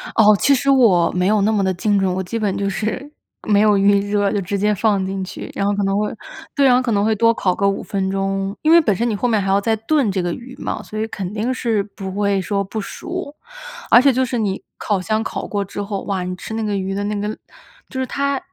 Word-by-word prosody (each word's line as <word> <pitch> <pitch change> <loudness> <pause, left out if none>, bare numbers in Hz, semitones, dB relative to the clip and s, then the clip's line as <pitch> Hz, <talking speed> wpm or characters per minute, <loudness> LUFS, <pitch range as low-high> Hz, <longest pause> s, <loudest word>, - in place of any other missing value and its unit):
哦， 215 -1 +6
其 280 - +4
实 275 +1 +1
我 225 -11 +4
没 180 0 0
有 210 0 +3
那 210 +2 +2
么 205 -2 +1
地 190 -1 +1
精 205 +3 +1
准。 190 -1 +1
我 190 - -2
基 210 +5 -4
本 205 -3 -1
就 200 0 -1
是 220 +9 -3 0.4
没 205 -1 +4
有 210 -1 +4
预 200 0 +4
热， 205 -1 +2
就 205 - 0
直 195 +2 -3
接 210 +1 +2
放 205 -2 +1
进 190 0 -3
去， 185 - -7
然 200 - -1
后 205 - +2
可 205 - -1
能 195 +1 +1
会 210 0 -1 0.4
对， 280 - +3
然 255 -2 +6
后 250 - +3
可 250 -2 -1
能 200 -2 +2
会 220 +1 +2
多 230 +2 +4
烤 185 -5 0
个 200 -2 +1
5 195 - 0
分 190 -1 -2
钟。 195 0 -2
因 315 - +3
为 340 - +8
本 220 -11 +1
身 235 +4 0
你 215 - -1
后 245 - 0
面 220 -3 +2
还 195 - -3
要 195 +1 +4
再 220 +2 +1
炖 225 0 +1
这 190 -1 -1
个 175 - -2
鱼 250 +8 -8
嘛， - - -4
所 215 - -7
以 220 - -1
肯 190 -4 -5
定 220 +4 -1
是 230 -5 0
不 195 -1 -7
会 200 0 0
说 200 +1 -1
不 200 +3 -5
熟。 335 - -6 0.5
而 240 - +8
且 275 0 +4
就 260 +1 +1
是 245 -1 -2
你 200 -4 -1 0.2
烤 205 -3 -1
箱 215 +3 -1
烤 - - -4
过 200 -1 -2
之 205 - -6
后， 200 -1 -4
哇， 190 -2 -2
你 180 0 -4
吃 220 - -8
那 225 - -2
个 210 -2 -1
鱼 190 0 -3
的 200 +1 -2
那 210 +1 -2
个 210 +1 -3 0.5
就 260 - -5
是 260 - 0
它 280 +2 -1
205 Hz, 290 characters per minute, -20 LUFS, 195-230 Hz, 0.5 s, 为